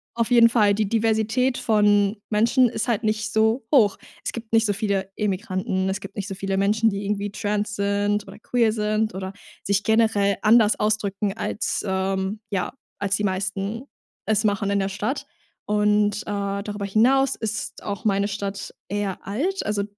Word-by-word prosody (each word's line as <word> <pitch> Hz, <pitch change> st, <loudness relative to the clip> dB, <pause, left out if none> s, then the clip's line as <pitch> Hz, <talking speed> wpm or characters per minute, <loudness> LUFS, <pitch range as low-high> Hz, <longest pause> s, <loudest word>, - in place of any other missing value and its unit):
auf 235 Hz, +1 st, -1 dB
jeden 230 Hz, -1 st, +7 dB
Fall, 210 Hz, -4 st, +4 dB
die 205 Hz, -1 st, 0 dB
Diversität 225 Hz, +3 st, +1 dB
von 205 Hz, -2 st, +3 dB
Menschen 230 Hz, +4 st, +4 dB
ist 225 Hz, +1 st, -3 dB
halt 230 Hz, 0 st, 0 dB
nicht 215 Hz, 0 st, -1 dB
so 220 Hz, +3 st, +2 dB
hoch. 215 Hz, -7 st, +5 dB, 0.3 s
Es -, -, -2 dB
gibt 230 Hz, -1 st, -8 dB
nicht 225 Hz, 0 st, +4 dB
so 205 Hz, -, +1 dB
viele 195 Hz, -2 st, -1 dB
Immigranten, 190 Hz, -2 st, -1 dB
es 190 Hz, +1 st, -2 dB
gibt 195 Hz, +1 st, -10 dB
nicht 200 Hz, 0 st, -3 dB
so 195 Hz, -, -5 dB
viele 195 Hz, 0 st, -2 dB
Menschen, 215 Hz, +3 st, +3 dB
die 200 Hz, 0 st, -4 dB
irgendwie 205 Hz, 0 st, -2 dB
trans 210 Hz, +1 st, -2 dB
sind 205 Hz, +1 st, 0 dB
oder -, -, -11 dB
queer 230 Hz, -1 st, +1 dB
sind 215 Hz, -2 st, 0 dB
oder 190 Hz, 0 st, -4 dB, 0.3 s
sich 200 Hz, 0 st, +1 dB
generell 220 Hz, -3 st, +3 dB
anders 220 Hz, -1 st, +5 dB
ausdrücken 210 Hz, -1 st, 0 dB
als, 215 Hz, -, -2 dB
ähm 190 Hz, +2 st, -1 dB
ja, 195 Hz, +2 st, -2 dB, 0.3 s
als 200 Hz, 0 st, +1 dB
die 210 Hz, -, -2 dB
meisten 195 Hz, +4 st, -2 dB, 0.4 s
es 215 Hz, 0 st, +1 dB
machen 200 Hz, -1 st, +1 dB
in 200 Hz, 0 st, +1 dB
der 195 Hz, 0 st, -1 dB
Stadt. 210 Hz, +8 st, -3 dB, 0.4 s
Und, 210 Hz, 0 st, +2 dB
äh, 200 Hz, -1 st, -3 dB
darüber 205 Hz, -1 st, -4 dB
hinaus 260 Hz, +6 st, +3 dB
ist 215 Hz, -1 st, -5 dB
auch 200 Hz, +2 st, -4 dB
meine 200 Hz, -1 st, +2 dB
Stadt 200 Hz, -1 st, -5 dB
eher 205 Hz, -2 st, -2 dB
alt. 345 Hz, -, -1 dB
Also, 205 Hz, -1 st, 0 dB
210 Hz, 175 wpm, -23 LUFS, 200-220 Hz, 0.4 s, jeden